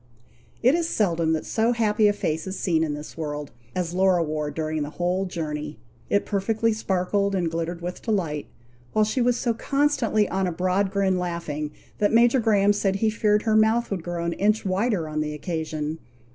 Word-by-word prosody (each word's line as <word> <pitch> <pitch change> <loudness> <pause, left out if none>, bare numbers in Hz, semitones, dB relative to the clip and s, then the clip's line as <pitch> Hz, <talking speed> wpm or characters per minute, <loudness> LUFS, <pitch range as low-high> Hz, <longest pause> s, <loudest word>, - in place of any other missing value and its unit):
It 255 +3 +6
is 335 0 +1
seldom 170 -6 +1
that 160 - -2
so 230 +2 +1
happy 215 -2 +3
a 205 - +3
face 160 -4 -2
is 190 - -4
seen 160 -3 +1
in 150 -2 -1
this 150 +1 -9
world, 150 -2 -4 0.2
as 175 -2 -2
Laura 185 -2 +3
wore 150 -1 -2
during 155 +1 -2
the 145 - -3
whole 180 +4 -1
journey. 150 -3 -4 0.3
It 200 - +2
perfectly 220 +3 +1
sparkled 200 -1 0
and 175 -3 0
glittered 170 +1 -3
with 180 +1 -5
delight, 170 -10 -1 0.5
while 215 - +4
she 235 +5 0
was 245 0 +2
so 240 -2 0
constantly 270 -4 +1
on 190 0 0
a - - -1
broad 185 +3 +1
grin 190 -2 +1
laughing, 170 -4 -3 0.3
that 205 - +3
Major 235 +3 +5
Graham 205 -3 +3
said 195 -1 0
he 215 +2 +1
feared 210 -1 +2
her 220 -2 +2
mouth 220 +2 +3
would 190 -3 -2
grow 170 0 -4
an 170 - 0
inch 210 +3 +1
wider 190 -2 0
on 155 0 -2
the 150 0 -3
occasion. 155 -1 -3
190 Hz, 195 wpm, -25 LUFS, 160-215 Hz, 0.5 s, It